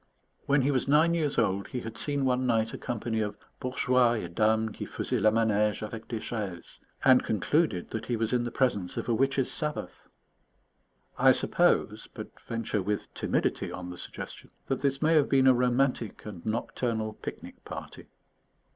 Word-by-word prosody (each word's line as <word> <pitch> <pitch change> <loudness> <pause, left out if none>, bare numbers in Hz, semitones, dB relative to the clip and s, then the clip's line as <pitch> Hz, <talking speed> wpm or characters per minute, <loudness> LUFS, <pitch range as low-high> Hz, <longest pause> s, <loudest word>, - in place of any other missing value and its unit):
When 140 -1 +3
he 140 - +2
was 130 -1 +1
nine 155 +4 +4
years 155 -4 0
old, 95 +1 +1
he 125 - -4
had 110 0 -7
seen 145 -2 0
one 130 0 +1
night 115 -1 +1
a - - -4
company 115 -1 -2
of 105 -1 -3 0.2
bourgeois 125 -2 +2
et 90 -7 -4
dames 110 +2 +2
qui - - -5
faisaient - - -2
la 110 - +6
manège 105 -1 +1
avec 110 +1 -7
des 115 - -3
chaises, 100 -7 -6 0.3
and 130 -1 +6
concluded 110 - 0
that 110 - -4
he 120 - 0
was 115 +1 -1
in 120 -1 +2
the 120 - -2
presence 115 -9 0
of - - -3
a 120 - +2
witches' 135 +2 +1
Sabbath. 150 0 -4 1.1
I - - +7
suppose, - - +1
but - - -9
venture 115 -2 -2
with 105 +2 -3
timidity - - -1
on 90 0 -6
the - - -7
suggestion, - - -8 0.2
that 135 - -1
this 140 +1 0
may 160 +1 +4
have 150 -3 +4
been 135 -1 +4
a 130 - +8
romantic 125 -1 0
and 95 -6 -8
nocturnal 110 0 -2
picnic - - -9
party. - - -8
115 Hz, 180 wpm, -28 LUFS, 110-130 Hz, 1.1 s, a